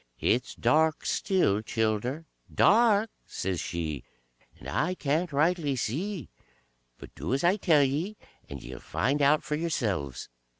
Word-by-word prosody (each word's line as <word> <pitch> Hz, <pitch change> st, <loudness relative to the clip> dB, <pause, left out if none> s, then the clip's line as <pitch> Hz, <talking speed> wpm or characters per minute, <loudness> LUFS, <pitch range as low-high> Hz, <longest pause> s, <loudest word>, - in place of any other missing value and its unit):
"It's 125 Hz, +3 st, 0 dB
dark 160 Hz, +1 st, +2 dB
still, 180 Hz, -, +1 dB
childer, 110 Hz, +7 st, -1 dB, 0.3 s
dark!" 220 Hz, -1 st, +4 dB, 0.2 s
says 90 Hz, -2 st, -3 dB
she, 80 Hz, -7 st, -4 dB, 0.5 s
"and -, -, -11 dB
I 180 Hz, +4 st, 0 dB
can't 155 Hz, +2 st, -1 dB
rightly 150 Hz, 0 st, +1 dB
see, 160 Hz, -, -3 dB, 0.7 s
but -, -, -12 dB
do 130 Hz, -, -2 dB
as 135 Hz, -, -2 dB
I 175 Hz, +3 st, +4 dB
tell 160 Hz, -7 st, +4 dB
ye, 160 Hz, +10 st, -1 dB, 0.3 s
and 70 Hz, -2 st, -8 dB
ye 65 Hz, -, -8 dB
'll -, -, -9 dB
find 140 Hz, -, -1 dB
out 145 Hz, +2 st, +4 dB
for -, -, -4 dB
yourselves. 110 Hz, -, -2 dB
145 Hz, 140 wpm, -28 LUFS, 110-175 Hz, 0.7 s, dark